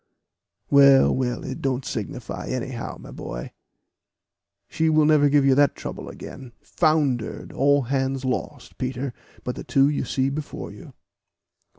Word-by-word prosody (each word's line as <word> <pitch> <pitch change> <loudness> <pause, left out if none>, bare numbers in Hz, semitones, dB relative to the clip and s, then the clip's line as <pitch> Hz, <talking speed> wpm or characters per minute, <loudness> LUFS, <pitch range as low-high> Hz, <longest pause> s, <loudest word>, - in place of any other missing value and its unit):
"Well, 140 -1 +7
well, 125 -2 -2
it 130 - -5
don't 130 -1 -1
signify 120 +1 -5
now, 130 -1 -4
my - - -11
boy; - - -7 1.2
she 160 0 0
will 155 -1 +4
never 150 -1 +5
give 140 -1 +4
you 135 - +5
that 145 +1 +4
trouble - - -7
again 130 -3 -10
foundered 150 -8 0
all 140 +1 +3
hands 135 +1 -1
lost, 130 - -4
Peter, 130 0 -3 0.3
but 125 - -3
the - - -7
two 140 -1 +3
you 150 - -1
see 135 0 0
before 150 +1 -6
you." - - -13
135 Hz, 145 wpm, -24 LUFS, 130-145 Hz, 1.2 s, Well